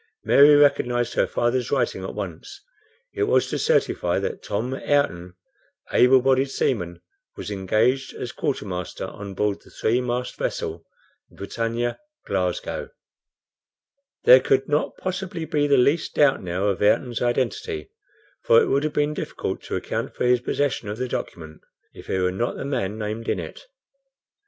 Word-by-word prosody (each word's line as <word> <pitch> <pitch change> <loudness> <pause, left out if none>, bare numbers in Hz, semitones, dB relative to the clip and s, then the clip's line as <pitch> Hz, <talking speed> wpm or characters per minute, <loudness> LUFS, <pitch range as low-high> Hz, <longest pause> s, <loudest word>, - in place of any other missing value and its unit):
Mary 145 +1 +7
recognized 125 -4 +3
her - - +2
father's 120 +1 0
writing 120 -8 0
at 95 - -6
once. 100 - -7 0.5
It 410 - 0
was 430 - +2
to - - -1
certify 485 +1 +1
that 465 -2 -3
"Tom 115 +6 -3
Ayrton, 115 -12 0 0.6
able 125 0 +5
bodied 135 +1 +3
seaman, 90 -11 -2 0.3
was - - -6
engaged 110 +7 +1
as 120 - -5
quartermaster 100 - -3
on 100 -1 -8
board 105 0 -1
the - - -19
three 120 +3 0
mast 125 0 -3
vessel, 80 +1 -3 0.4
the - - -21
BRITANNIA, 115 +4 -3 0.3
Glasgow." - - -2 1.3
There 130 - +9
could 135 +1 +1
not 150 0 0
possibly 185 -3 -4
be 145 -2 +1
the 140 -1 +4
least 140 +6 +2
doubt 145 -2 +4
now 90 +2 -2
of 100 - -2
Ayrton's 120 +3 +2
identity, 130 - -1 0.5
for 485 -1 +5
it - - +3
would 140 +1 +2
have 155 -1 -1
been 150 +1 +1
difficult - - -4
to - - -3
account - - -3
for - - -1
his 125 0 +4
possession 130 -5 -1
of 105 - -4
the 130 +1 -2
document 80 -9 -6 0.3
if - - -13
he - - -1
were 90 0 +1
not 115 +6 -2
the - - -5
man 120 -7 -2
named 110 +1 -4
in - - +1
it. - - -9
125 Hz, 160 wpm, -23 LUFS, 105-145 Hz, 1.3 s, There